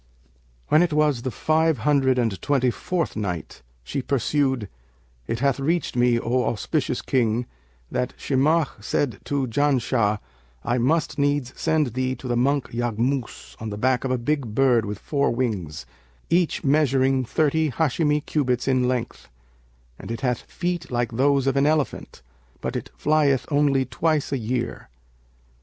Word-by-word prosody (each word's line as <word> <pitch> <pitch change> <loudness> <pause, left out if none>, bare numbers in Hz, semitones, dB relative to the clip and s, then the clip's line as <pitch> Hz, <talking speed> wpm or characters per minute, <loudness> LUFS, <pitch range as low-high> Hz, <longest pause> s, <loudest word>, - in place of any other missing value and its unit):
When 155 - +5
it 175 -3 +1
was 150 -5 +2
the 130 - -2
Five 160 +3 +1
Hundred 135 0 +2
and 115 -7 0
Twenty 130 -3 +2
fourth 175 +6 -2
Night, 90 -6 -4 0.2
She 135 - -3
pursued, 130 -3 0 0.6
It 115 - -2
hath 140 -2 +2
reached 165 +3 0
me, 120 -1 +3
O 125 +2 0
auspicious 125 +2 -1
King, 120 -2 +1 0.5
that 125 - -2
"Shimakh 140 -3 +1
said 130 +3 -1
to 140 -2 0
Janshah, 125 -4 +1 0.5
'I 120 - 0
must 150 +6 +1
needs 145 -3 0
send 150 -7 0
thee 130 +1 -1
to 130 - -9
the 120 - 0
monk 140 +3 +1
Yaghmus 120 - -2
on 110 - -4
the 105 - -5
back 130 +2 +1
of 135 - -2
a 130 - +1
big 120 -3 -2
bird 125 -4 +3
with 105 0 -4
four 140 +6 0
wings, 105 -11 -2 0.5
each 170 -1 +2
measuring 135 -2 +3
thirty 155 +5 +1
Hαshimi[FN#562] 150 +2 +1
cubits 125 -5 0
in 130 -2 +2
length; 125 -2 -3 0.7
and - - -9
it 115 +1 -4
hath 125 -3 0
feet 175 -1 -4
like 120 -1 -1
those 135 +3 +2
of 135 - +1
an 140 +1 +3
elephant, 150 - -1 0.4
but - - -4
it - - -4
flieth 145 -4 +2
only 140 -2 +3
twice 155 +2 0
a 140 - +1
year.' 120 - -3
130 Hz, 155 wpm, -24 LUFS, 120-145 Hz, 0.7 s, When